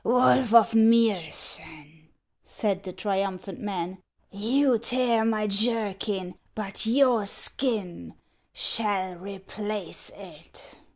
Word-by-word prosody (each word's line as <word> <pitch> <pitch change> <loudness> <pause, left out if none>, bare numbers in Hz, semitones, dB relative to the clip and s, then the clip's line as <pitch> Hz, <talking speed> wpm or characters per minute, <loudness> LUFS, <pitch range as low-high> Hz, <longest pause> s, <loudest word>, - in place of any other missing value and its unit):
" - - -42
Wolf 250 0 +3
of 230 -1 +6
Miosen," 170 -8 +1 0.4
said 200 -3 -3
the 185 - -8
triumphant 195 -2 -4
man, 185 -2 -5 0.3
"you 240 +5 +1
tear 240 -1 +1
my 220 -1 0
jerkin, 205 -3 -1 0.2
but 210 0 -3
your 245 -4 +3
skin 195 - -1 0.4
shall 200 -4 +2
replace 200 +1 -6
it." - - -12
210 Hz, 100 wpm, -25 LUFS, 190-230 Hz, 0.4 s, of